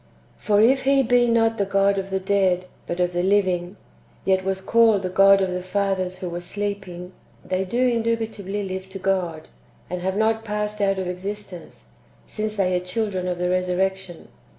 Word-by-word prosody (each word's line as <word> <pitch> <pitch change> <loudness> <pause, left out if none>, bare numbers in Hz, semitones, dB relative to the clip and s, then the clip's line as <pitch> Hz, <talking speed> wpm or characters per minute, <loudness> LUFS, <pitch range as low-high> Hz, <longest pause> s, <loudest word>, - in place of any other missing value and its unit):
For 205 -1 +2
if 265 +4 +4
He 275 0 +4
be 245 0 +3
not 225 -1 +2
the 200 - +2
God 195 0 +2
of 195 0 -5
the 190 0 -1
dead, 190 -2 +1 0.2
but 175 - -4
of 180 0 +1
the 175 - 0
living, 185 -1 +1 0.5
yet 190 -1 +2
was 190 0 -1
called 220 0 +3
the 185 - -3
God 195 +1 +6
of 185 - -1
the 180 0 -3
fathers 185 -1 -1
who 185 -1 -5
were 175 +1 -4
sleeping, 190 -2 -5 0.3
they 185 +1 -1
do 245 +7 +1
indubitably 225 -4 -1
live 190 0 -5
to 190 - -7
God, 185 -4 -2 0.4
and 180 0 -3
have 190 +2 -1
not 220 +1 +1
passed 210 -1 -3
out 195 -1 +2
of 190 - -2
existence, 190 0 -7 0.4
since 215 0 -4
they 185 -3 +1
are 180 - -1
children 185 -1 -2
of 180 -1 -2
the 180 0 0
resurrection. 185 0 -2
195 Hz, 185 wpm, -23 LUFS, 180-210 Hz, 0.5 s, God